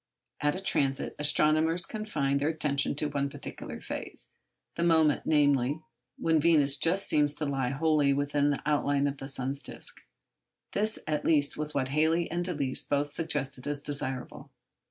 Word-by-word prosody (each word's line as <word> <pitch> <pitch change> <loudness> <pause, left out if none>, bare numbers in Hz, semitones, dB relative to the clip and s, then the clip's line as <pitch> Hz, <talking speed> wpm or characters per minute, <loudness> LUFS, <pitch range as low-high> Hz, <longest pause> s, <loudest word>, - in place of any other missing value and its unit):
At 145 0 +1
a - - -4
transit, 135 -8 0
astronomers 155 +3 +3
confine 150 -11 -1
their 145 +2 +1
attention 150 -3 0
to 150 - 0
one 140 -1 -1
particular - - -8
phase—the - - -8
moment, 160 -3 +3
namely, 145 -2 +3 0.4
when 160 -1 +2
Venus 145 -4 +4
just 185 +4 +2
seems 150 -1 +3
to 150 - -2
lie 135 -3 -1
wholly 145 +1 +2
within 145 +1 +1
the 145 - -2
outline 145 -1 +1
of 140 0 -2
the 135 - -7
sun's 135 +1 -3
disc. - - -5 0.7
This 215 +1 +1
at 150 -1 -1
least 145 -3 +2
was 150 0 -3
what 130 -2 0
Halley 160 +4 +1
and 175 +1 -1
Delisle 145 -7 -2
both 145 0 0
suggested 145 -4 -1
as 145 -1 -2
desirable. 135 -3 -5
145 Hz, 155 wpm, -29 LUFS, 140-160 Hz, 0.7 s, Venus